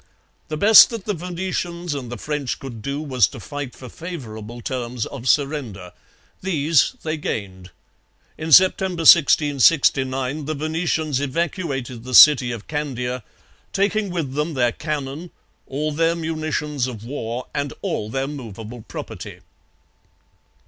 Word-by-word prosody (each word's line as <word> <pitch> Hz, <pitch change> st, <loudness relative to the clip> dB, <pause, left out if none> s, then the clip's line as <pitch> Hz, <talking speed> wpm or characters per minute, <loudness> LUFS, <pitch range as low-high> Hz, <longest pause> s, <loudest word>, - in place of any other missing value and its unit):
The 155 Hz, -, -4 dB
best 210 Hz, +6 st, +8 dB
that 230 Hz, -5 st, -6 dB
the 210 Hz, -, -1 dB
Venetians 175 Hz, -1 st, -4 dB
and 130 Hz, -4 st, -6 dB
the 120 Hz, -, -5 dB
French 145 Hz, +2 st, -3 dB
could 120 Hz, -5 st, -9 dB
do 140 Hz, +5 st, -3 dB
was 130 Hz, -9 st, +3 dB
to -, -, -10 dB
fight 145 Hz, -3 st, -6 dB
for 130 Hz, -, -10 dB
favourable 120 Hz, -9 st, -8 dB
terms 120 Hz, -2 st, -4 dB
of 130 Hz, -2 st, -5 dB
surrender. 130 Hz, -, -1 dB, 0.5 s
These 160 Hz, -5 st, +2 dB
they 155 Hz, 0 st, -2 dB
gained. 95 Hz, -9 st, -5 dB, 0.7 s
In 160 Hz, +1 st, -5 dB
September 185 Hz, 0 st, +5 dB
1669 140 Hz, -3 st, +4 dB
the 155 Hz, +1 st, -3 dB
Venetians 155 Hz, -1 st, -1 dB
evacuated 140 Hz, -, -3 dB
the 125 Hz, 0 st, -2 dB
city 135 Hz, -5 st, +8 dB
of 115 Hz, -3 st, -7 dB
Candia, 125 Hz, -4 st, -3 dB, 0.5 s
taking 205 Hz, +1 st, +1 dB
with 165 Hz, -7 st, -3 dB
them 150 Hz, +2 st, -2 dB
their 120 Hz, -2 st, +2 dB
cannon, 150 Hz, +3 st, -5 dB, 0.4 s
all 150 Hz, +3 st, -2 dB
their 165 Hz, +2 st, +1 dB
munitions 155 Hz, -4 st, -2 dB
of 115 Hz, -4 st, -8 dB
war, 120 Hz, -2 st, -4 dB
and 145 Hz, -1 st, -2 dB
all 105 Hz, -, -2 dB
their 135 Hz, +3 st, -2 dB
movable 115 Hz, -4 st, -8 dB
property. -, -, -8 dB
145 Hz, 135 wpm, -22 LUFS, 125-160 Hz, 0.7 s, best